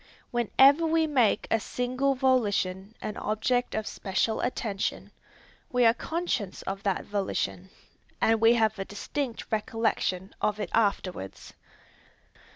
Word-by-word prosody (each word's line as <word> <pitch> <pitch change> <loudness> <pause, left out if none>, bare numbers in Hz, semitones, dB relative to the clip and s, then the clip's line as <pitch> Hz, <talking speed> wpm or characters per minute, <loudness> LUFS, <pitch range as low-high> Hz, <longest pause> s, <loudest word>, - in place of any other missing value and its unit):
Whenever 270 +6 +5
we 320 0 +3
make 255 -9 +2
any 225 - +3
single 255 +5 -1
volition 210 -6 +1
an 210 - -4
object 245 +4 0
of 220 -1 -2
special 205 +3 -1
attention, 215 -5 -2 0.6
we 250 -2 +3
are 225 - +6
conscious 275 - -3
of 195 0 -4
that 200 -2 -1
volition, 95 - -2 0.5
and 225 0 +3
we 230 +1 +6
have 220 -2 +1
a - - -1
distinct 240 +5 -4
recollection 215 -4 -1
of 210 0 0
it - - -4
afterwards. 185 - -1
220 Hz, 125 wpm, -28 LUFS, 200-250 Hz, 0.6 s, are